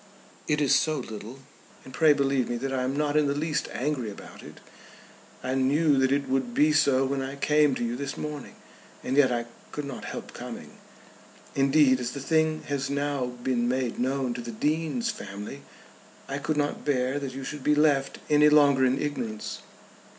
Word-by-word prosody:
"It 150 Hz, 0 st, +1 dB
is 140 Hz, -, +3 dB
so 155 Hz, -1 st, +3 dB
a -, -, -3 dB
little. 120 Hz, +1 st, -8 dB, 0.4 s
And 130 Hz, -, -11 dB
pray 155 Hz, +3 st, +5 dB
believe 140 Hz, -3 st, +1 dB
me 120 Hz, -, -1 dB
that 135 Hz, +2 st, -3 dB
I 130 Hz, -, 0 dB
am 130 Hz, +2 st, -1 dB
not 150 Hz, -1 st, 0 dB
in 150 Hz, -1 st, +4 dB
the 140 Hz, -, 0 dB
least 150 Hz, 0 st, -1 dB
angry 130 Hz, -4 st, -2 dB
about 100 Hz, -, -11 dB
it. -, -, -12 dB, 0.8 s
I 130 Hz, -, -1 dB
knew 140 Hz, +2 st, +3 dB
that 130 Hz, 0 st, +2 dB
it 140 Hz, 0 st, +1 dB
would 130 Hz, -2 st, -1 dB
be 150 Hz, +1 st, +4 dB
so 135 Hz, -3 st, +4 dB
when 135 Hz, 0 st, -1 dB
I 135 Hz, +1 st, -5 dB
came 150 Hz, -1 st, +3 dB
to -, -, -3 dB
you 120 Hz, +1 st, -2 dB
this 140 Hz, +2 st, -5 dB
morning; 150 Hz, -3 st, -6 dB, 0.5 s
and 130 Hz, -, -1 dB
yet 140 Hz, -3 st, +5 dB
I 120 Hz, -1 st, -1 dB, 0.3 s
could 150 Hz, -, -4 dB
not 135 Hz, -3 st, -7 dB
help -, -, -7 dB
coming. -, -, -8 dB, 0.8 s
Indeed 135 Hz, -1 st, +4 dB
as 125 Hz, 0 st, -3 dB
the 140 Hz, -, -5 dB
thing 155 Hz, +2 st, +1 dB
has 140 Hz, -1 st, -2 dB
now 140 Hz, -2 st, -1 dB
been 125 Hz, -1 st, -1 dB
made 130 Hz, -2 st, -1 dB
known 130 Hz, 0 st, 0 dB
to 120 Hz, -, -5 dB
the 120 Hz, -, -7 dB
Dean's 160 Hz, -, -1 dB
family 105 Hz, -, -8 dB, 0.7 s
I 135 Hz, +1 st, -3 dB
could 150 Hz, +1 st, -2 dB
not 145 Hz, 0 st, -1 dB
bear 135 Hz, -1 st, 0 dB
that 135 Hz, -2 st, -5 dB
you 135 Hz, -, -6 dB
should 145 Hz, 0 st, -6 dB
be 150 Hz, -, +3 dB
left 145 Hz, -2 st, +2 dB
any 150 Hz, 0 st, +5 dB
longer 145 Hz, -3 st, +5 dB
in 130 Hz, +1 st, +2 dB
ignorance." 115 Hz, -8 st, -4 dB
140 Hz, 195 wpm, -27 LUFS, 130-150 Hz, 0.8 s, pray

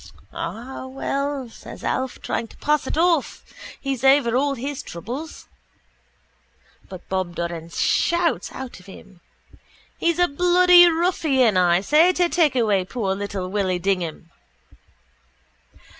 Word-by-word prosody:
—Ah, 260 Hz, +3 st, -6 dB
well, 275 Hz, 0 st, -3 dB
says 225 Hz, -, -12 dB
Alf, 260 Hz, -1 st, -2 dB
trying 230 Hz, -, -3 dB
to -, -, -18 dB
pass 300 Hz, -2 st, 0 dB
it -, -, -3 dB
off. 335 Hz, -4 st, +1 dB, 0.3 s
He's 270 Hz, -3 st, -4 dB
over 270 Hz, -3 st, +4 dB
all 280 Hz, +2 st, +1 dB
his 275 Hz, +3 st, -5 dB
troubles. 250 Hz, -, -8 dB, 1.4 s
But 185 Hz, -2 st, -11 dB
Bob 185 Hz, -2 st, -3 dB
Doran 170 Hz, -1 st, -5 dB
shouts 340 Hz, -, 0 dB
out 265 Hz, -6 st, -8 dB
of 180 Hz, -, -18 dB
him. 190 Hz, -2 st, -14 dB, 0.8 s
—He's 335 Hz, 0 st, +1 dB
a 355 Hz, 0 st, +3 dB
bloody 355 Hz, +2 st, +6 dB
ruffian, 315 Hz, -, +1 dB
I 175 Hz, -1 st, +3 dB
say, 310 Hz, -, +4 dB
to 355 Hz, -1 st, +1 dB
take 320 Hz, -7 st, +2 dB
away 210 Hz, -6 st, +2 dB
poor 195 Hz, 0 st, -2 dB
little 195 Hz, -1 st, -4 dB
Willy 190 Hz, -3 st, 0 dB
Dignam. 175 Hz, -3 st, -3 dB
260 Hz, 130 wpm, -22 LUFS, 190-305 Hz, 1.4 s, bloody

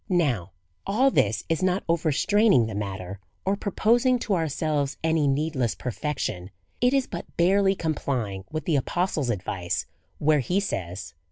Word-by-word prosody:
Now, 135 Hz, -, +1 dB, 0.3 s
all 250 Hz, +7 st, +3 dB
this 105 Hz, -, +2 dB
is 165 Hz, +1 st, 0 dB
not 185 Hz, +1 st, +1 dB
overstraining 170 Hz, -, +3 dB
the 110 Hz, -, -5 dB
matter, 100 Hz, -2 st, -5 dB, 0.3 s
or 195 Hz, +1 st, +2 dB
proposing 235 Hz, +5 st, +2 dB
to 210 Hz, -, 0 dB
ourselves 155 Hz, -4 st, 0 dB
any 160 Hz, -2 st, +2 dB
needless 135 Hz, -4 st, 0 dB
perfection. 125 Hz, -, -3 dB, 0.3 s
It 245 Hz, 0 st, +4 dB
is 270 Hz, -1 st, +2 dB
but 170 Hz, -, -8 dB
barely 195 Hz, +3 st, +4 dB
complying 125 Hz, -, -2 dB
with 155 Hz, -2 st, -4 dB
the 160 Hz, -4 st, +2 dB
apostle's 155 Hz, -1 st, -1 dB
advice, 90 Hz, -4 st, -2 dB, 0.3 s
where 150 Hz, 0 st, +3 dB
he 180 Hz, +9 st, +1 dB
says. 95 Hz, -, -4 dB
155 Hz, 145 wpm, -26 LUFS, 115-190 Hz, 0.3 s, It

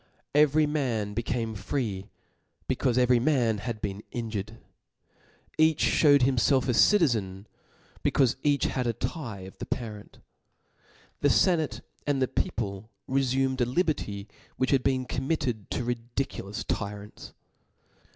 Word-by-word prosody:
Every 150 Hz, +1 st, +5 dB
mar» 135 Hz, -8 st, 0 dB
became 115 Hz, 0 st, -2 dB
free, 100 Hz, -2 st, -3 dB, 0.6 s
becaufe 125 Hz, -1 st, +1 dB
every 125 Hz, -1 st, +4 dB
man 120 Hz, -5 st, +2 dB
had 110 Hz, -1 st, -5 dB
bf^cn 100 Hz, +1 st, -3 dB
injured 110 Hz, -4 st, -3 dB
j 110 Hz, -, -13 dB, 1.0 s
each 160 Hz, -1 st, +4 dB
ihewed 145 Hz, -3 st, +5 dB
himfelf 130 Hz, +1 st, +3 dB
a 125 Hz, -, +2 dB
citizen, 110 Hz, -, +3 dB, 0.6 s
becaufe 130 Hz, -4 st, +3 dB
each 145 Hz, -2 st, +2 dB
had 125 Hz, -2 st, 0 dB
the 115 Hz, -, +1 dB
tye 120 Hz, -, -5 dB
of 95 Hz, +1 st, -11 dB
a -, -, -3 dB
parent. 110 Hz, -4 st, -6 dB, 1.0 s
The 145 Hz, -, +3 dB
fenatc 155 Hz, -, +2 dB, 0.3 s
and 145 Hz, -2 st, +1 dB
the 130 Hz, -, +2 dB
people 105 Hz, -3 st, -3 dB, 0.2 s
refumed 130 Hz, 0 st, +1 dB
a -, -, +4 dB
liberty 125 Hz, -, -1 dB, 0.3 s
which 130 Hz, -, +1 dB
had 135 Hz, -2 st, +4 dB
been 130 Hz, -1 st, 0 dB
committed 130 Hz, -5 st, -2 dB
to -, -, -2 dB
ri* 120 Hz, 0 st, -1 dB, 0.2 s
diculous 105 Hz, -7 st, -3 dB
tyrants. 105 Hz, +1 st, -5 dB
125 Hz, 130 wpm, -28 LUFS, 105-135 Hz, 1.0 s, Every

